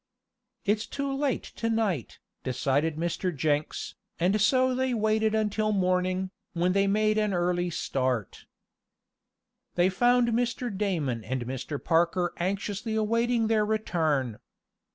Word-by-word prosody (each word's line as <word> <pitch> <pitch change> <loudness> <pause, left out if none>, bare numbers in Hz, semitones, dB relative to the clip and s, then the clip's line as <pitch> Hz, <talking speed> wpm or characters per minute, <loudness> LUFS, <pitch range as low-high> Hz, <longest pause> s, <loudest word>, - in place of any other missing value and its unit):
"It's 210 +2 +1
too 280 -1 -3
late 275 -1 0
to 230 - -1
night," 205 - -1 0.3
decided 140 +4 0
Mr. 170 +3 -1
Jenks, 150 +1 -1 0.3
and 190 +5 +2
so 255 +4 +4
they 260 -1 0
waited 220 0 +2
until 215 0 +1
morning, 185 -1 +1 0.2
when 180 +1 +1
they 195 0 +3
made 215 +1 +2
an 210 -3 +1
early 175 0 +1
start. 130 - -2 1.3
They 180 +1 +4
found 245 +4 +3
Mr. 235 -1 -1
Damon 160 - -1
and 125 +1 -3
Mr. 130 +4 -4
Parker 170 +3 +1
anxiously 200 +4 -2
awaiting 230 +2 +1
their 220 -1 +3
return. 160 - 0
195 Hz, 125 wpm, -28 LUFS, 165-220 Hz, 1.3 s, so